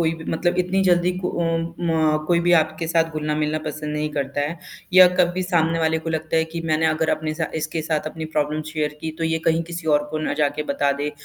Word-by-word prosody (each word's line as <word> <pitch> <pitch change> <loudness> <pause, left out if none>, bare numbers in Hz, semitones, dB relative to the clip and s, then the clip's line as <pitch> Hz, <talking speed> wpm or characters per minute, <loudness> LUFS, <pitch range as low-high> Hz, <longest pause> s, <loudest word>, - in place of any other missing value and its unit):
कोई 165 -1 +2
भी 160 0 -10
मतलब 175 +2 0
इतनी 185 +2 +1
जल्दी 175 -1 +3
को 185 - -2
अ, - - +1 0.4
म 160 -2 +1
कोई 170 0 +3
भी 175 +1 +2
आपके 160 0 +2
साथ 165 0 +3
घुलना-मिलना 155 0 -1
पसंद 150 0 -4
नहीं 150 0 -1
करता 140 0 -2
है 150 +4 -2 0.4
या 185 0 +10
कभी 180 +1 +1
सामने 165 -2 +1
वाले 160 0 +1
को 165 +1 -5
लगता 160 0 -1
है 160 - +3
कि 170 - -3
मैंने 160 0 +1
अगर 160 0 +1
अपने 155 0 -1
साथ 160 0 -4
इसके 155 +1 -2
साथ 155 -1 -1
अपनी 160 +1 -5
प्रॉब्लम 155 0 -1
शेयर 150 -1 -2
की 160 - -3
तो 165 - -1
ये 160 0 +1
कहीं 165 0 +2
किसी 170 0 -7
और 145 0 +2
को 155 - -2
ना 155 - -2
जाके 150 0 0
बता 140 -1 0
दे, 145 +1 -3
160 Hz, 240 wpm, -22 LUFS, 155-165 Hz, 0.4 s, या